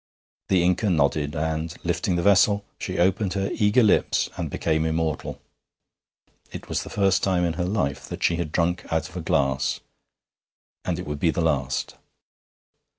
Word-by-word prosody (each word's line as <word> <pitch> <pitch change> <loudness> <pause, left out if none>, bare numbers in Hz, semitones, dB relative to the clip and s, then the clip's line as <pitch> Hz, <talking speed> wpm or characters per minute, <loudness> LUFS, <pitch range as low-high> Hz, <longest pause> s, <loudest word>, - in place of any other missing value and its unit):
The 95 -3 +3
Inca 90 +4 +2
nodded, 75 -2 +1
and, 80 +1 -2
lifting 90 +1 0
the 85 - 0
vessel, 100 +1 +4
she - - -4
opened 95 +2 +1
her 100 0 -1
eager 110 +3 +3
lips 105 - +2
and - - -3
became 80 -1 0
immortal. 80 -1 -2 1.1
It - - -8
was - - -1
the - - -8
first 95 -2 +2
time 90 -2 +1
in 85 - 0
her 90 +2 -2
life 70 -9 -2
that - - -6
she 85 - +2
had 85 -3 -3
drunk 85 +1 0
out 80 0 0
of - - -16
a 90 - -3
glass, 70 -6 0 1.0
and 90 -2 -2
it 90 - -5
would 75 0 -4
be 85 - +2
the 85 - 0
last. 70 -5 -1
85 Hz, 170 wpm, -24 LUFS, 80-95 Hz, 1.1 s, vessel